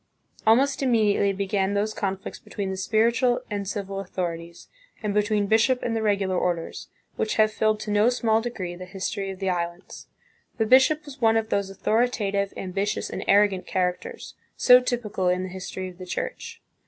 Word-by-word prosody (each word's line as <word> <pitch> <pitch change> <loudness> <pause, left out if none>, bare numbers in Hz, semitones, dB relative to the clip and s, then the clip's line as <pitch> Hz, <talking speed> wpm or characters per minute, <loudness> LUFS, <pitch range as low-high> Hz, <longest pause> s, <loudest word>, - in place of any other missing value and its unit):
Almost 270 +6 +4
immediately 215 -6 +3
began 195 0 -1
those 210 +2 0
conflicts 195 -1 -4
between 195 -2 -5
the - - -3
spiritual 235 +5 +2
and 200 -1 -3
civil 195 -1 -4
authorities, 170 -3 -5 0.4
and 210 -1 -1
between 210 0 +1
bishop 225 +5 +2
and 230 - -1
the 225 - -1
regular 200 -3 +1
orders, 170 -2 -3 0.3
which 215 - -1
have 215 0 +4
filled 215 0 +1
to 215 - -4
no 210 +3 +4
small 225 -3 +1
degree 200 -7 -4
the 185 +1 -8
history 195 +1 -4
of 190 - -6
the 190 -1 -1
islands. 175 0 -5 0.5
The 225 - +1
bishop 265 +6 +4
was 280 -2 -11
one 225 -1 +4
of 220 0 -1
those 200 -2 0
authoritative, 200 -1 0
ambitious, 195 +2 -2
and - - -4
arrogant 200 -2 +3
characters, 180 -1 -3 0.2
so 250 0 +7
typical 235 -7 -2
in 180 +1 0
the 185 - -5
history 185 0 -6
of 180 0 -15
the 185 - -8
Church. - - -5
205 Hz, 175 wpm, -25 LUFS, 190-225 Hz, 0.5 s, so